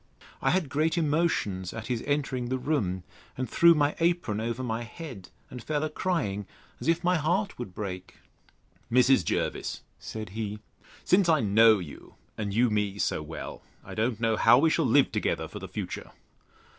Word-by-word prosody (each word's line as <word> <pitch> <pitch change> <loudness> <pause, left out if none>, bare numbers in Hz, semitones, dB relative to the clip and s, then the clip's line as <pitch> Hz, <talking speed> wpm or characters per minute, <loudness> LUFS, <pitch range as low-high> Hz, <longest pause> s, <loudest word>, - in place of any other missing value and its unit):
I - - +2
had 185 -4 +1
great 155 +5 0
emotions 150 - 0
at 110 -1 -6
his 120 -3 -2
entering 135 -4 -1
the 130 - 0
room, 110 - -1 0.3
and 130 0 -2
threw 170 0 +6
my 145 -1 +2
apron 170 -11 +1
over 115 +3 -3
my 115 -1 -2
head, 120 - -9 0.2
and 125 - -7
fell 150 +4 -1
a 155 - -2
crying, 105 - -1 0.3
as - - -6
if 165 +1 +2
my 180 +1 +3
heart 180 +6 0
would 100 -7 -6
break. 95 -3 -6 0.8
Mrs. 125 -3 +5
Jervis, - - -2 0.2
said 110 -2 -6
he, 105 +1 -4 0.5
since 185 -1 +3
I 155 -5 +4
know 110 +1 +6
you, 85 -6 -10 0.2
and 105 -2 -3
you 115 +3 +3
me 105 -1 0
so 100 - 0
well, 75 +1 -7 0.2
I - - -8
don't 115 +1 -1
know 115 -1 +1
how - - +6
we 160 +4 +4
shall 165 - +2
live 135 +4 +4
together - - -1
for - - -8
the - - -7
future. - - -5
125 Hz, 180 wpm, -28 LUFS, 105-155 Hz, 0.8 s, threw